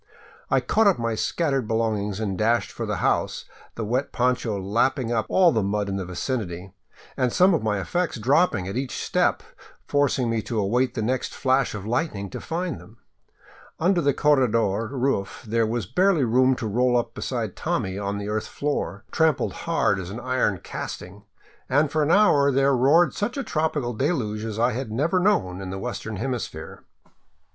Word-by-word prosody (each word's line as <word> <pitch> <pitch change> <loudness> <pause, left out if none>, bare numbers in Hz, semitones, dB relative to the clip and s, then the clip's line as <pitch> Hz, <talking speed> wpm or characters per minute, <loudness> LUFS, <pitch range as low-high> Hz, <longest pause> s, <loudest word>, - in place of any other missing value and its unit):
I - - +3
caught 220 -1 +2
up 195 - +4
my 115 -1 -1
scattered 135 +1 -1
belongings 110 -3 -1
and 100 -3 -2
dashed 115 +4 +1
for - - -5
the - - -1
house, - - 0 0.3
the 115 - -3
wet 125 +6 -1
poncho 120 -4 0
lap 105 +7 +1
ping 125 -5 -3
up 110 -2 0
all 180 -3 +5
the 110 - +1
mud 100 +1 -1
in 95 - -2
the 95 - -3
vicinity, 90 -1 -4 0.4
and 125 -2 +1
some 185 +5 +4
of 165 - +1
my 105 -2 0
effects 175 - -1
dropping 120 - +2
at 95 - -5
each 130 0 -3
step, - - +1 0.4
forcing 140 -3 +1
me 115 -1 0
to 115 - -4
await 120 +5 +1
the 110 - -1
next 125 +3 -2
flash 130 -3 +1
of 100 -1 -6
lightning 110 - -2
to - - -6
find 175 +1 -3
them. 110 +3 -17 0.8
Under 175 +1 +2
the 140 -2 +3
corredor 115 -7 +2
roof 130 -6 -2
there 115 +1 +1
was 115 -2 -2
barely 180 - +2
room 130 +2 +3
to 120 - -5
roll 125 +3 +2
up 120 - -2
beside - - -3
Tommy 95 +1 -2
on 100 0 -2
the 100 0 -5
earth 105 0 -2
floor, 140 -8 -3
trampled 160 -3 +1
hard 165 - 0
as 90 -2 -6
an 110 +5 -6
iron 120 -7 0
casting, 100 +3 -7 0.4
and 145 +2 +2
for 155 - +1
an 150 - +1
hour 150 -8 +5
there 135 +1 +3
roared 145 +8 +4
such 230 +6 -3
a 275 - -1
tropical 155 - -1
deluge 110 -5 -1
as 110 -2 -4
I 120 +2 +2
had 125 -1 -4
never 155 +11 +1
known 140 - +1
in 95 - -6
the 95 - -4
western 110 0 -5
hemisphere. 115 -8 -5
120 Hz, 185 wpm, -24 LUFS, 105-140 Hz, 0.8 s, all